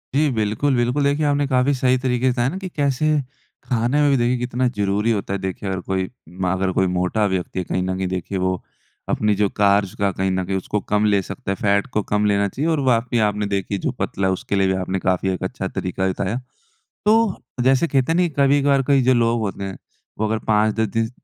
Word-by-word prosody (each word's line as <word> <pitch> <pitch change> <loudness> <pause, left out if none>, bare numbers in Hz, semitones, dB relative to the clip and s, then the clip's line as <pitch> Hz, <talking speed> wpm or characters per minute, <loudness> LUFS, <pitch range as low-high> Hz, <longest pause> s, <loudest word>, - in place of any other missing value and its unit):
जी, 150 +1 +3
बिल्कुल, 110 +6 +1
बिल्कुल। 125 +4 +1
देखिए 145 +2 +1
आपने 145 0 +2
काफ़ी 130 +1 +2
सही 130 -1 +2
तरीके 130 0 +1
से, 120 - -1
है 125 - +2
ना, 175 - -5
कि 190 -1 -6
कैसे 140 0 0 0.6
खाने 125 +4 +1
में 145 - +4
भी 135 - +3
देखिए 120 +1 +1
कितना 125 +1 -1
ज़रूरी 105 -1 0
होता 100 -3 -2
है, 100 - -2
देखिए 95 +1 -4
अगर 95 -1 -2
कोई 95 0 -2 0.2
म 90 +2 -3
अगर 95 0 0
कोई 95 +1 +1
मोटा 90 +4 0
व्यक्ति 95 -2 -2
है, - - -1
कहीं 90 - -1
न 95 0 -2
कहीं 95 0 -1
देखिए, 95 +1 -3
वो 95 0 -1 0.5
अपनी 105 -1 +1
जो 105 +1 +2
कार्ब्स 100 -1 +2
का 100 -1 +1
कहीं 95 +1 -1
न 95 0 0
कहीं 95 +1 -1
उसको 105 +3 -2
कम 105 0 +3
ले 100 -2 +3
सकता 100 +3 -5
है, - - 0
फैट 100 +2 +1
को 105 - +2
कम 105 +1 0
लेना 100 -1 +2
चाहिए। 145 - -2
और 160 - +1
वाक़ई 120 0 +1
आपने 105 0 -2
देखिए, 100 0 -2
जो - - -2
पतला 95 0 -2
है 95 - +2
उसके 95 - -3
लिए 95 -1 +3
भी 95 - +2
आपने 95 +1 -2
काफ़ी 95 +1 0
एक 90 - -5
अच्छा - - -3
तरीका 95 +1 -3
भी 95 - +2
बताया। 100 +4 -2 0.7
तो 220 -2 +4 0.3
जैसे 130 +5 +3
कहते 135 -1 +1
हैं - - +1
नहीं, 175 -1 +2
कभी-कभार 140 0 +4
कई 140 -2 +4
जो 130 +1 +4
लोग 115 -1 +2
होते 100 -2 -3
हैं, 95 -1 -5 0.4
वो 110 - +1
अगर 110 +1 0
5-10 110 +1 +2
दिस 115 0 0
105 Hz, 235 wpm, -21 LUFS, 95-130 Hz, 0.7 s, में